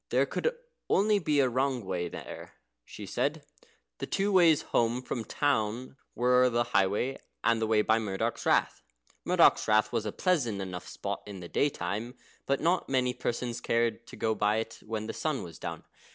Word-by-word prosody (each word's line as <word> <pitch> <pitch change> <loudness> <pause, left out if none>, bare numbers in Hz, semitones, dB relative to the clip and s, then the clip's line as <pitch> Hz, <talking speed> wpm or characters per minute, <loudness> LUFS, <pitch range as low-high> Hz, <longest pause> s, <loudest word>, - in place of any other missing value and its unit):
(There - - +3
could 480 +1 -1 0.3
only 210 +1 +3
be 150 -5 +1
a 130 - +3
wrong 130 -2 0
way 90 -2 -2
there, - - -9 0.3
she - - -9
said.) - - -2 0.5
The - - -4
two 200 +1 0
ways 170 -5 +5
home 120 +2 0
from 125 - -3
the 110 - -10
town 125 -3 -1 0.2
were 125 +1 +4
the 120 0 +1
highway, 105 +3 +1 0.2
and 115 -1 +2
the 110 - +1
way 110 -1 +3
by 110 +1 +3
Murdoch's 100 -4 -2
Rath. - - +2 0.4
Murdoch's - - +4
Rath 110 0 +3
was 110 -2 -1
a - - -2
pleasant 130 - 0
enough 90 -2 -6
spot - - -5
in 100 -2 -7
the 85 - -8
daytime, 110 0 -1 0.3
but 140 0 +1
not 175 +2 +1
many 130 -2 +1
persons 120 -1 -3
cared 115 0 0
to - - -10
go 110 -1 0
by 105 0 +1
it 115 0 -4
when 110 -1 -3
the - - -4
sun 155 -4 -2
was 85 -3 -10
down. - - -6
115 Hz, 185 wpm, -29 LUFS, 105-135 Hz, 0.5 s, ways